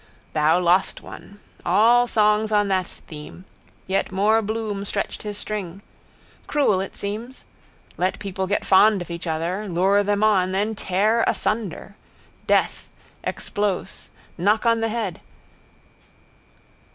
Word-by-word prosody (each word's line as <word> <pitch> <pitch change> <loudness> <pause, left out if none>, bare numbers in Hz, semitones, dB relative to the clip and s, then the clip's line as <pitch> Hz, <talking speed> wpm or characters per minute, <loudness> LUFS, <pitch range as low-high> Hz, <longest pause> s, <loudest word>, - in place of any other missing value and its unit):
Thou 155 +3 +3
lost 180 +2 +2
one. 205 +1 -12 0.2
All 240 +3 +4
songs 215 -1 +2
on 205 -1 +2
that 185 -2 +1
theme. 155 +4 -12 0.4
Yet 190 0 -1
more 210 +4 +3
Bloom 215 -2 -3
stretched 200 - -3
his 210 -1 -5
string. 200 -3 -5 0.6
Cruel 240 -11 +2
it 195 - -7
seems. 220 +6 -6 0.5
Let 185 +1 0
people 190 -2 -4
get 205 - -1
fond 200 0 +5
of 170 - -11
each 170 +1 -5
other: 175 +6 -2
lure 190 +4 +3
them 205 +1 0
on. 190 -4 +3
Then 205 +3 0
tear 210 +3 +1
asunder. 205 -2 -2 0.5
Death. - - +1 0.3
Explos. 205 -3 -3 0.3
Knock 210 +6 +2
on 230 -1 +3
the 225 - 0
head. 215 -6 -3
200 Hz, 130 wpm, -23 LUFS, 185-215 Hz, 0.6 s, fond